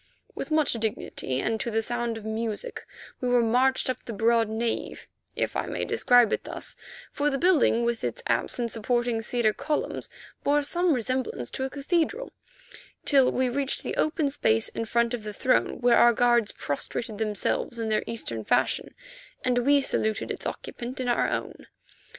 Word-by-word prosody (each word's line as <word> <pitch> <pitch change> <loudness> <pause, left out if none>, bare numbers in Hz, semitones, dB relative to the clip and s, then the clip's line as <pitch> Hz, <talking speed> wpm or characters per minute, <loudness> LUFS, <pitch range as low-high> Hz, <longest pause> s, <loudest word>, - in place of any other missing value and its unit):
With - - -5
much 310 -1 +2
dignity 215 - -2
and 225 0 -1
to 235 - -2
the 225 0 0
sound 240 -1 -2
of 220 - -9
music 220 - -4 0.3
we 250 - -1
were 245 -1 +4
marched 255 +3 +2
up 255 -1 -3
the 230 - -6
broad 225 +1 +2
nave, 225 +1 -3 0.3
if - - -1
I - - -1
may - - -2
describe 245 -3 +4
it - - -1
thus, - - -6 0.4
for 295 +1 +1
the 275 - -1
building, 285 -8 +3
with 235 -1 -1
its 120 -2 -3
apse 115 - 0
and 235 -2 -2
supporting 240 0 0
cedar 225 -1 +1
columns, 300 +5 -3 0.3
bore 290 +1 +3
some 345 +3 +2
resemblance 250 - -2
to 265 - -3
a - - -3
cathedral, 340 - -1 0.7
till 270 -3 +5
we 260 0 +1
reached 270 +2 -1
the - - -3
open 305 -2 +1
space 110 - +2
in 230 - -4
front 235 +1 +1
of 245 - -2
the 210 0 -6
throne, 115 - +1
where 245 -1 +5
our 240 0 +6
guards 240 -2 +3
prostrated 215 - -4
themselves 215 +2 -1
in 225 -1 -2
their 215 - +2
Eastern 115 - -3
fashion, - - 0 0.5
and 250 -1 +3
we 280 +3 +4
saluted 220 -5 0
its - - -4
occupant 245 +1 -6
in 255 - -2
our 240 - +2
own. - - -4
240 Hz, 180 wpm, -27 LUFS, 220-265 Hz, 0.7 s, our